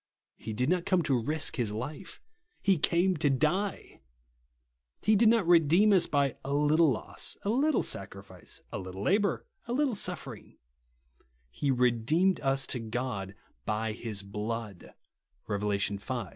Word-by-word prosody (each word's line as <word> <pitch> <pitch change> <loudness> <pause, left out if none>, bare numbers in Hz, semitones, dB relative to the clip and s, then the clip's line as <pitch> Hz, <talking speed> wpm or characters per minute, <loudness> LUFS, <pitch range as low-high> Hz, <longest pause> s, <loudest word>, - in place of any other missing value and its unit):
He 110 - -7
did 125 +4 -1
not 180 +1 0
come 180 -2 +2
to 135 -5 +1
rish 155 +6 0
his 115 -5 -1
life; 140 - -7 0.4
he 195 -4 +3
came 180 +4 +2
to 150 -1 +2
die! 165 +9 -1 1.0
He 215 - +4
did 215 +2 +5
not 225 -4 +3
redeem 175 +5 +5
us 185 - +4
by 140 -3 0
a 140 +1 -2
little 150 +2 +4
loss, 125 - -4
a 200 - 0
little 285 +6 +2
sacrifice, 95 -2 -6
a - - -4
little 95 +1 -7
labour, 200 - +1 0.2
a 240 - -2
little 275 -1 +1
suffering, 200 - -5 0.5
" - - -38
He 140 - -2
redeemed 125 +9 +2
us 135 0 +1
to 125 - -3
God 110 -4 -4 0.3
by 110 +1 -1
his 105 -2 -4
blood," 105 0 -6 0.5
(Rev. 105 -2 -3
v. 100 +4 -1
135 Hz, 150 wpm, -29 LUFS, 105-175 Hz, 1.0 s, did